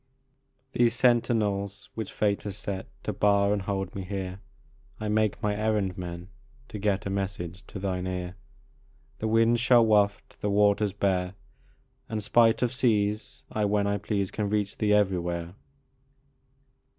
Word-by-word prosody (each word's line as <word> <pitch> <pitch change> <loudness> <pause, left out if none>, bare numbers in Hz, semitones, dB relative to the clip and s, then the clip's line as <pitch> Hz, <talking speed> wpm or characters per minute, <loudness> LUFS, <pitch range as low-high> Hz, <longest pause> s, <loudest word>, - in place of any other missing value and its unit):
These 120 -2 +3
sentinels 105 -5 +1
which 110 -3 -5
Fate 100 -1 0
has 100 -3 -5
set 95 -2 -4 0.2
To - - -2
bar 100 0 +3
and 105 - -1
hold 95 -1 -3
me 100 - -4
here 95 0 -5 0.6
I 110 - -3
make 110 -1 +1
my 105 -1 +1
errand 105 -3 0
men, 90 0 -7 0.4
to 105 - -6
get 100 -1 0
A 100 - -2
message 95 -2 -4
to - - -8
thine 95 -1 -2
ear. 90 0 -4 0.8
The 110 - -1
winds 115 +1 +3
shall 120 -2 +6
waft, 105 -2 +1
the 105 - 0
waters 100 0 +3
bear, 95 -2 0 0.7
And 110 -2 -3
spite 115 +2 +4
of 125 0 0
seas 105 -4 0
I, 105 -1 0
when 100 0 +1
I 100 0 0
please, 100 -1 -1
Can 105 -2 -2
reach 105 -1 -1
thee 105 -1 +1
everywhere. 90 -4 +1
100 Hz, 150 wpm, -27 LUFS, 95-110 Hz, 0.8 s, shall